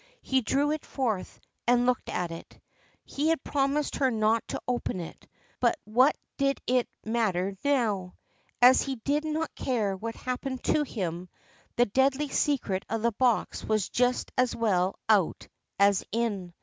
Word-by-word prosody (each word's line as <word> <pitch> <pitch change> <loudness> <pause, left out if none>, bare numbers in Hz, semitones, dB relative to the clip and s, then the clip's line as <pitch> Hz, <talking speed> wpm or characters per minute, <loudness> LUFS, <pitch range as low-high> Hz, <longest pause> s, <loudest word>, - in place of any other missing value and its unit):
He 265 -1 +2
drew 280 +5 +1
it 310 -1 -2
forth 225 -9 -3 0.3
and 245 0 +4
looked 250 0 0
at 175 -2 -2
it. 165 - -10 0.5
He 290 +3 -2
had 325 -4 +1
promised 280 +1 0
her 265 -2 +3
not 220 -1 +2
to - - -4
open 245 -6 -1
it, 170 - -9 0.3
but 350 - +2
what 250 +7 +3 0.2
did 275 -1 +1
it 250 -1 +1 0.2
matter 200 -4 0
now? 220 -10 0 0.5
As 255 +1 +8
he 270 -1 -2
did 285 +6 -1
not 315 +1 -2
care 215 -7 -1
what 225 +4 -5
happened 255 +1 -4
to 305 - +2
him, 180 - -4 0.5
the 245 - +4
deadly 270 +6 +1
secret 240 -11 0
of 225 0 -2
the 235 - +3
box 240 +1 0
was 215 -3 0
just 250 0 +1
as 250 -1 +2
well 190 -5 +1
out 205 -6 +2 0.3
as 200 -1 +4
in. 205 -6 -2
240 Hz, 160 wpm, -28 LUFS, 205-270 Hz, 0.5 s, As